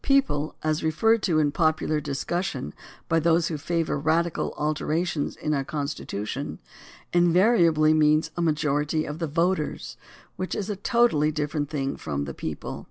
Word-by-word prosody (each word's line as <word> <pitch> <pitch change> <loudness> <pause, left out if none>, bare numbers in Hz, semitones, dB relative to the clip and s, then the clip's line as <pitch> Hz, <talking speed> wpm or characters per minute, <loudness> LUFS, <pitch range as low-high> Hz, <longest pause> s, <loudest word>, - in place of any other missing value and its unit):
"People" 260 - +2
as 155 0 0
referred 220 +9 +2
to 170 -6 +1
in 150 -2 +3
popular 155 -1 +1
discussion 145 - -3 0.3
by 165 - +2
those 165 +1 +2
who 160 - -3
favor 165 -1 -1
radical 160 +3 0
alterations 155 +1 -1
in 150 - -2
our 140 -2 0
Constitution 140 -4 -4 0.6
invariably 175 -3 +4
means 155 +1 +3
a 175 - -2
majority 150 -1 0
of 150 +2 -6
the 165 - -1
voters, 165 +1 -1 0.4
which 185 - -3
is 210 0 -3
a - - -2
totally 200 - +2
different 150 -1 -2
thing 140 -3 -2
from 70 -2 -3
the 70 - -6
people. 75 +2 -5
155 Hz, 150 wpm, -25 LUFS, 150-170 Hz, 0.6 s, invariably